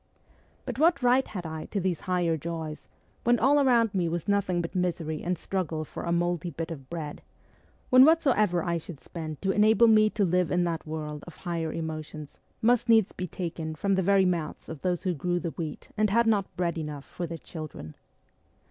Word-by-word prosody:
But 250 -1 -5
what 315 -4 +4
right 250 +2 +4
had 180 -4 -6
I 160 -1 -5
to 205 - -3
these 180 -3 -1
higher 175 -3 0
joys, 160 -1 -6 0.3
when 240 +1 +4
all 280 +5 +4
round 235 -5 +3
me 180 -4 +1
was 170 0 -3
nothing 200 -3 +1
but 170 -1 -3
misery 170 -4 -1
and 180 +1 -1
struggle 165 -3 -3
for - - -7
a 170 - -1
mouldy 175 0 0
bit 165 +1 -5
of 135 -5 -8
bread; 160 -3 -5 0.7
when 255 0 +9
whatsoever 245 - +4
I 170 -1 0
should 160 -2 -9
spend 155 -3 -7
to 195 - +2
enable 220 +3 +5
me 215 -1 +6
to 210 -2 +1
live 180 -1 +1
in 175 +4 +2
that 165 -2 -2
world 150 -1 -5
of 175 - -10
higher 165 -2 -2
emotions 155 -2 -6 0.2
must 240 +1 +3
needs 220 -4 +5
be 185 - -5
taken 165 -2 -5
from 200 +5 0
the 190 - +2
very 195 +1 +4
mouths 170 -4 -2
of 160 -4 -7
those 180 -1 -1
who 185 -2 0
grew 175 +3 -1
the 170 -2 -3
wheat 155 -3 -6
and 215 0 +2
had 235 +4 +3
not 210 -4 0
bread 170 -2 -1
enough 150 -3 -6
for 175 - -5
their 165 0 -5
children 155 - -8
175 Hz, 200 wpm, -28 LUFS, 160-205 Hz, 0.7 s, when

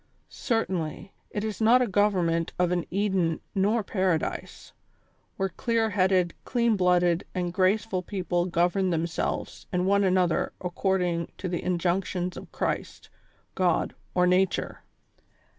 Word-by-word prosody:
Certainly, 190 - -2 0.2
it 205 - -3
is 220 0 -4
not 230 +3 +6
a - - -1
government 180 -5 +1
of 180 -1 +2
an 175 -2 -1
Eden 190 -4 0
nor 210 +3 +2
Paradise, 185 -5 -2 0.6
where 195 0 0
clear 225 +4 0
headed, 185 -2 +2
clean 235 -2 +1
blooded 180 -2 +3
and 175 -1 -2
graceful 190 +1 +1
people 180 -2 -1
govern 180 +2 +1
themselves 165 -1 -2
and 180 -1 0
one 200 +1 +3
another 185 -3 +2
according 180 -2 -1
to 185 - -4
the 175 -1 -2
injunctions 180 0 -1
of - - -10
Christ, - - -3 0.4
God 180 -3 +1 0.2
or 180 -1 +4
Nature. 185 +1 +1
185 Hz, 125 wpm, -27 LUFS, 175-200 Hz, 0.6 s, not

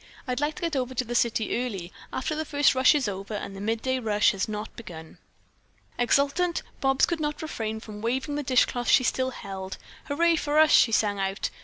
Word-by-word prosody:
I'd 250 0 -1
like 295 +1 -1
to - - -9
get 335 -3 -1
over 260 -1 -2
to 255 - -1
the 240 - -5
city 235 0 +1
early, 190 -8 -5 0.2
after 265 - -2
the 310 +1 -2
first 290 -2 +3
rush 260 +3 +5
is 275 -6 +1
over 200 +2 -5
and 200 -1 -5
the 195 - -7
midday 230 +5 -1
rush 210 -3 +3
has 195 +1 -3
not 210 +1 -5
begun." 160 -8 -10 0.8
Exultant 285 +8 +1 0.2
Bobs 270 -1 +3
could 340 -2 -2
not 300 0 -3
refrain 220 -8 -4
from 215 -2 -9
waving 260 +6 -1
the 295 - -1
dishcloth 250 -2 +1
she 260 - +6
still 260 +1 0
held. 195 -5 -7 0.3
"Hurray 335 +3 +2
for 295 0 -1
us!" 310 0 +6
she 230 - +6
sang 205 -2 +1
out. 195 +1 -2
250 Hz, 205 wpm, -26 LUFS, 210-290 Hz, 0.8 s, she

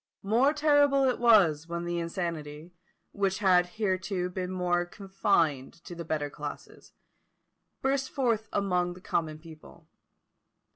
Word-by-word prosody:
More 235 +8 +3
terrible 290 -2 +3
it 255 -2 +1
was 185 -10 +4
when 170 0 -4
the 175 0 -2
insanity, 165 -2 -5 0.4
which 195 -1 -1
had 180 -3 +4
hitherto 185 -3 -1
been 180 0 -4
more 180 -1 0
confined 175 -7 -1
to 175 - -9
the 170 0 -6
better 155 -2 -2
classes, - - -9 0.9
burst 270 0 0
forth 230 -5 -1
among 180 -3 0
the - - -12
common 155 -4 -2
people. 160 0 -15
180 Hz, 130 wpm, -28 LUFS, 170-215 Hz, 0.9 s, was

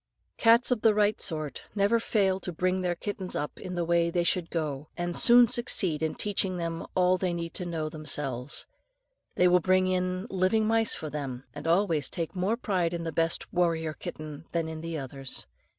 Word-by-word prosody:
] - - -49
Cats 235 +3 +6
of 240 -4 +1
the 220 -2 +4
right 210 0 +2
sort 155 -4 -2
never 205 +3 +3
fail 195 -4 +1
to 180 - -5
bring 185 +2 0
their 175 -1 0
kittens 190 0 -4
up 145 - -4
in 180 - -6
the 175 -1 -1
way 170 0 +2
they 175 0 0
should 170 0 +1
go, 150 -3 -3
and 175 0 -2
soon 240 0 +7
succeed 210 - +1
in 160 -1 -1
teaching 195 -3 0
them 165 -1 -4
all 185 0 +3
they 185 -1 0
know 170 -1 -3
themselves. 145 -4 -4 0.7
They 180 - +4
will 180 0 +5
bring 185 +2 +3
in 185 +1 -1
living 195 +4 +2
mice 225 0 +2
for 155 -2 -6
them, 135 -4 -5
and 145 +2 -7
always 170 -3 +2
take 165 +2 -4
more 190 +5 0
pride 180 -7 -1
in 170 - -4
the 165 - -3
best 165 +1 -1
warrior 165 -3 +1
kitten 155 0 -8
than 165 -1 0
in 160 0 -6
the 165 -1 -4
others. 135 -1 -2
175 Hz, 195 wpm, -28 LUFS, 160-190 Hz, 0.7 s, soon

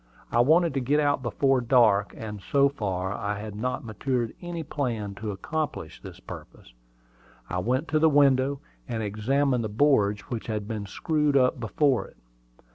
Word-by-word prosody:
I 120 - +2
wanted 160 +5 +4
to 135 - 0
get 140 +4 +1
out 145 -2 +2
before 130 +2 +1
dark; 115 -5 +3
and 105 -2 -7
so 140 +6 +3
far, 95 -7 -3
I 105 0 -3
had 105 0 -7
not 125 +3 -3
matured 120 +1 -2
any 175 -2 -5
plan 120 -9 -3
to 110 - -3
accomplish 145 - -4
this - - -10
purpose. - - -11 0.8
I 90 - -1
went 130 - 0
to 155 - +2
the 160 +1 +5
window, 140 -1 +3 0.3
and 115 -2 -3
examined 125 +5 0
the 110 - -3
boards 105 -4 +2
which 115 -2 -6
had 105 -2 -3
been 105 -2 -4
screwed 150 - +1
up 125 -1 +3
before 125 +4 +1
it. - - -20
125 Hz, 170 wpm, -26 LUFS, 105-140 Hz, 0.8 s, the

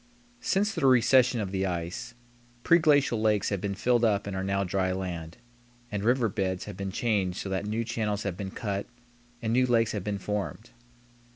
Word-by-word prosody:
Since 210 -3 +1
the 135 - +1
recession 125 -1 +5
of 95 -2 -4
the 95 0 0
ice, 90 +7 -4 0.5
preglacial 145 -8 +4
lakes 105 -2 +2
have 100 -3 -2
been 100 -1 -2
filled 120 +3 +2
up 105 -3 +2
and 100 -1 -4
are 95 - -2
now 100 0 0
dry 95 0 0
land, 85 -3 -5 0.5
and 105 -1 -2
river 120 +1 +3
beds 95 -2 -2
have 105 - -7
been 95 0 -4
changed 100 -4 0
so 100 - -4
that 95 +2 -2
new 110 +2 -1
channels 110 -3 -2
have 100 -4 -2
been 95 +1 -5
cut 100 0 -3 0.6
and 110 0 0
new 125 +1 +3
lakes 115 -2 +3
have 105 -3 -3
been 105 0 -2
formed. 105 +3 -4
105 Hz, 190 wpm, -28 LUFS, 95-120 Hz, 0.6 s, recession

